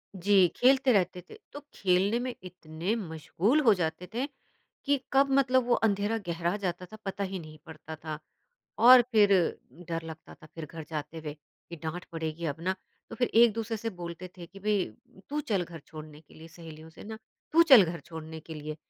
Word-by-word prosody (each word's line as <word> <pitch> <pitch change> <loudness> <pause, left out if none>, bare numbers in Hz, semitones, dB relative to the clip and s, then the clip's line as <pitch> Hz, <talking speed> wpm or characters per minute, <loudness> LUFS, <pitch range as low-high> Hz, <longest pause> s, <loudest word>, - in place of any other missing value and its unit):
जी। 190 0 +4
खेलते 260 0 +4
रहते 180 -2 +1
थे, - - -11 0.2
तो 290 - -6
खेलने 195 +4 +2
में 250 0 -3
इतने 180 +2 -4
मशगूल 195 - 0
हो 230 -7 +6
जाते 180 0 -3
थे 250 +3 -1 0.6
कि 285 -1 +2
कब 275 +1 +4
मतलब 260 -2 +3
वो 240 - +4
अँधेरा 210 +1 +1
गहरा 170 +2 -1
जाता 180 -2 -3
था 215 - -12
पता 195 +1 -3
ही 190 -1 -4
नहीं 155 -2 -11
पड़ता 160 0 -9
था 155 -1 -4 0.6
,और 250 +1 +9
फिर 205 -2 +5 0.6
डर 165 0 -2
लगता 160 0 -10
था 155 - -16
फिर 160 -2 -6
घर 160 +1 -9
जाते 155 +1 -5
हुए, 150 -2 -6 0.3
कि 170 - -8
डाँट 160 +3 -5
पड़ेगी 160 0 -4
अब 145 +2 -4
ना, 185 +2 0 0.4
तो - - -7
फिर 245 - +1
एक-दूसरे 225 -1 +4
से 225 +1 -4
बोलते 175 -1 -8
थे 170 - -8
कि 195 +3 -14
भई 205 -2 +1 0.5
तू 300 +1 -1
चल 200 -9 -1
घर 170 -1 -10
छोड़ने 155 -1 -11
के 150 - -22
लिए 160 +1 -12
सहेलियों 160 -1 -12
से - - -13
ना 220 +1 -7 0.3
तू 335 +1 +7
चल 265 - +8
घर 170 -1 -5
छोड़ने 160 +1 -9
के 160 0 -10
लिए, 150 0 -6
180 Hz, 195 wpm, -29 LUFS, 160-220 Hz, 0.6 s, और